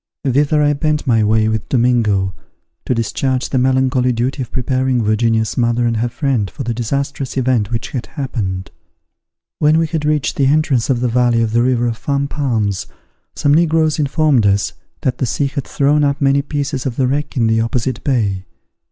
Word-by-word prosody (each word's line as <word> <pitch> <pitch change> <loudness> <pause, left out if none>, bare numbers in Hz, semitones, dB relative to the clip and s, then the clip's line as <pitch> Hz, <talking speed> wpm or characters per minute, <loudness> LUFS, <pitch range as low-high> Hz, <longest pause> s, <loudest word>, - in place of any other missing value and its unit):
Thither 145 +2 +2
I 145 0 +3
bent 150 +1 -1
my 115 -4 +3
way 110 +1 +2
with 110 -1 -2
Domingo, 115 -7 +2 0.5
to 125 - +1
discharge 130 +3 -1
the 130 - 0
melancholy 130 0 +2
duty 125 +4 -2
of 125 - -6
preparing 130 -1 0
Virginia's 110 +1 +1
mother 120 0 +1
and 115 -1 0
her 120 +2 0
friend 125 -7 -1
for - - -7
the 120 - -2
disastrous 135 +4 -3
event 125 -5 +1
which 115 -2 -4
had 125 -3 -4
happened. 100 - -4 0.9
When 155 +1 +4
we 165 - +2
had 160 -1 -3
reached 150 -1 0
the 135 - +3
entrance 140 -4 +1
of 125 -3 +1
the 125 - +1
valley 120 -1 +2
of 110 - -1
the 115 +1 +2
river 120 -1 +1
of 115 -1 -2
Fan 140 -1 -1
Palms, 115 -10 -1 0.5
some 145 -1 +2
negroes 160 -1 +2
informed 145 -5 +2
us 100 0 +1 0.3
that 130 - -1
the 130 - 0
sea 140 - -1
had 140 -1 -3
thrown 145 +1 +2
up 140 +1 +1
many 140 -1 +3
pieces 145 -2 -3
of 120 - -4
the 130 - +1
wreck 145 +2 -2
in 115 - +2
the 110 0 +2
opposite 115 +1 -2
bay. 100 -9 -1
130 Hz, 190 wpm, -17 LUFS, 115-140 Hz, 0.9 s, When